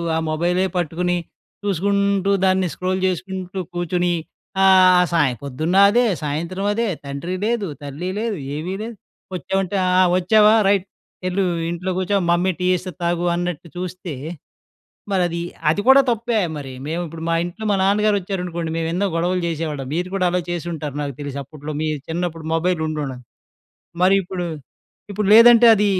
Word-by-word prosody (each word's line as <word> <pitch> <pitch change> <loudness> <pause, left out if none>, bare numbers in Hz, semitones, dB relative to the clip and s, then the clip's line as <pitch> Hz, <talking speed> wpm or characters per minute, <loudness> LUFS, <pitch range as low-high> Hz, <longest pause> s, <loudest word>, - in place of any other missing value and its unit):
ఆ - - +1
మొబైలే 175 +4 +1
పట్టుకుని, 175 +2 0 0.5
చూసుకుంటూ, 200 0 +1
దాన్ని 185 -1 +2
స్క్రోల్ 185 +1 -2
చేసుకుంటూ 185 0 -4 0.2
కూర్చొని, 175 0 0 0.5
ఆహ్, 185 -1 +6
సాయం 145 -8 +2
పొద్దున్న 155 +6 -2
అదే, 240 +4 +3 0.2
సాయంత్రం 170 +7 -3
అదే, 230 +1 0 0.2
తండ్రి 140 +6 -4
లేదు, 225 -3 0 0.2
తల్లి 145 +6 -5
లేదు, 225 -1 -1 0.2
ఏమీ 165 +5 -4
లేదు. 230 +1 -6 0.4
వచ్చామంటే 190 +2 -2
ఆ! - - +2 0.3
వచ్చావా 210 +4 +5 0.2
రైట్. 195 -2 +2 0.4
"వెళ్ళు 185 +2 0 0.3
ఇంట్లో 175 +2 -3
కూర్చో, 190 +2 +1
మమ్మీ 180 +2 +2
టీ 180 - -1
చేస్తే 180 +1 -3
తాగు" 170 0 0
అన్నట్టు 175 -2 -3
చూస్తే 180 -2 -5 1.0
మరది, 175 -2 0 0.3
అది 165 - 0
కూడా 265 +1 +8
తప్పే 230 0 0 0.2
మరి! 135 -2 -7
మేము 165 +3 -2
ఇప్పుడు, 160 +1 -9
మా 165 - +2
ఇంట్లో, 175 +5 -7
మా 205 - +3
నాన్నగారు 205 +2 +3
వచ్చారనుకోండి, 180 -3 -4
మేము 165 0 -1
ఎన్నో 195 +4 0
గొడవలు 175 +2 0
చేసేవాళ్ళం. 155 -4 -3
మీరు 175 +2 -1
కూడా 190 -2 +1
అలా 180 0 +1
చేసుంటారు, 165 -4 -4
నాకు 140 -2 -4
తెలిసి. 140 -1 -5
అప్పట్లో 150 +2 -8
మీ 155 - 0 0.2
చిన్నప్పుడు 165 -1 -3
మొబైల్ 170 0 0
ఉండడ 150 -4 -3 0.9
మరి 190 +2 +5
ఇప్పుడు 180 0 -4 0.7
ఇప్పుడు 205 0 -1
లేదంటే 235 +1 +8
అది 210 0 +2
180 Hz, 150 wpm, -21 LUFS, 165-195 Hz, 1.0 s, కూడా